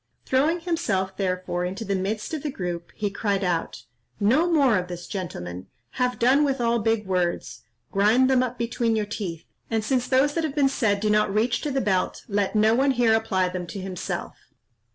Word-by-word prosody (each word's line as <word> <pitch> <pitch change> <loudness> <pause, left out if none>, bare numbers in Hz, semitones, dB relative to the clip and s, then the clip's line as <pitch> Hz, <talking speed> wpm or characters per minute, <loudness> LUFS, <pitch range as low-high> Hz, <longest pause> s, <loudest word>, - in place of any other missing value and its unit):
Throwing 305 +7 +2
himself, 225 - -1
therefore, 185 -2 -2
into 190 +5 -4
the 200 - -1
midst 200 +7 -2
of 310 - -2
the 300 - -3
group, 175 -8 -5
he 205 -1 -2
cried 200 -1 -1
out, 165 -8 -2 0.4
"No 270 +12 +3
more 275 -8 +4
of 180 - -5
this, 175 -1 -7
gentlemen! 90 - -6 0.2
have 250 0 -1
done 260 +5 +4
with 275 -2 0
all 235 0 +2
big 225 -1 0
words; 180 -2 -1 0.3
grind 215 +6 +4
them 260 -1 +4
up 250 -1 -2
between 235 -1 0
your 215 -1 0
teeth; 185 -6 -5 0.2
and 225 -1 0
since 250 0 0
those 275 +2 +3
that 330 - -1
have 310 -2 -2
been 280 -2 +3
said 210 -7 +1
do 210 0 +1
not 210 -1 +3
reach 230 +4 +1
to 300 - -2
the 270 0 0
belt, 190 -5 0
let 205 0 0
no 215 +1 +4
one 270 +4 +3
here 235 -2 +4
apply 195 -5 +1
them 180 -1 -5
to 195 - -6
himself." 185 -1 -4
215 Hz, 200 wpm, -25 LUFS, 190-255 Hz, 0.4 s, more